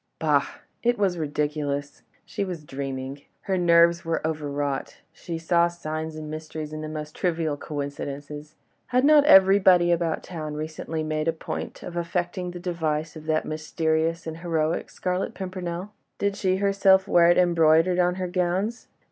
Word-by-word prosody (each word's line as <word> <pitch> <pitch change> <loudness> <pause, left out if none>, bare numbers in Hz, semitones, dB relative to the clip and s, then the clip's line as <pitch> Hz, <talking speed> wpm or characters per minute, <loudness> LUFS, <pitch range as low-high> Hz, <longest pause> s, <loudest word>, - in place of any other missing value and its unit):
Bah! 150 -3 +2 0.3
It 240 0 +2
was 190 -4 +1
ridiculous! 145 -1 -2 0.2
she - - -3
was 180 -5 -5
dreaming! 135 0 -5 0.2
her 190 - -1
nerves 170 -1 +4
were 165 0 -1
overwrought, 145 -3 -2
and - - -30
she 170 -2 -6
saw 170 +1 +3
signs 160 -2 -5
and 155 -1 -7
mysteries 155 0 -6
in 155 - -5
the 155 - -5
most 150 -1 -6
trivial 165 -4 0
coincidences. 145 +1 -6 0.3
Had 250 +2 +2
not 295 -1 +6
everybody 190 -6 +6
about 170 -2 0
town 155 -4 -6
recently 155 +1 -4
made 155 0 -2
a - - +4
point 160 - -6
of 175 - -7
affecting 175 +1 -2
the 175 0 -7
device 160 -3 -2
of 155 0 -10
that 155 0 +1
mysterious 160 +2 -1
and 160 0 -5
heroic 165 -1 -1
Scarlet 180 +1 -3
Pimpernel? 185 0 -5 0.3
Did 200 0 0
she 190 -2 +1
not 190 - -4
herself 195 -1 +4
wear 170 -1 +5
it 175 - +5
embroidered 170 0 +4
on 180 0 +2
her 185 -1 -3
gowns? 185 +6 -1
165 Hz, 165 wpm, -25 LUFS, 155-180 Hz, 0.3 s, not